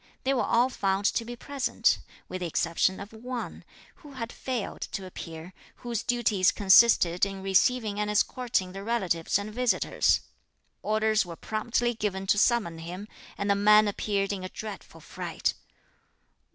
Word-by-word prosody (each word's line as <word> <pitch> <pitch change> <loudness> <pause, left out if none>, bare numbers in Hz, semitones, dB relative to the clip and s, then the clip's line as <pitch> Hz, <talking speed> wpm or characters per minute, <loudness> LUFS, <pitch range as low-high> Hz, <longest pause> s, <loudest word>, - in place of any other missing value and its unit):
They 270 - +2
were 250 - +1
all 240 +2 +3
found 195 -4 -1
to 230 - +2
be 240 +1 -7
present, 275 +1 0 0.3
with 185 - -6
the 175 - -1
exception 170 +3 +1
of 200 +2 -9
one, 245 +2 -6 0.3
who 295 -3 -14
had 235 -2 -5
failed 250 -5 -4
to 195 - -4
appear, 165 -1 -9 0.2
whose 235 -2 -4
duties 220 -6 +2
consisted 190 -3 +5
in 195 -1 0
receiving 210 +2 +2
and 210 0 -1
escorting 210 -2 0
the 195 +1 -7
relatives 190 -8 0
and 205 +1 -6
visitors. 250 +1 +2 0.6
Orders 215 0 +2
were 170 -2 -8
promptly 235 +5 -1
given 195 -3 -3
to 205 +1 +3
summon 210 -9 +2
him, 180 +5 -7 0.3
and 200 - -2
the 200 - +4
man 210 +1 +5
appeared 200 0 -1
in 190 -2 -5
a 185 - -5
dreadful 215 +1 -9
fright. - - -3
210 Hz, 155 wpm, -27 LUFS, 190-235 Hz, 0.6 s, consisted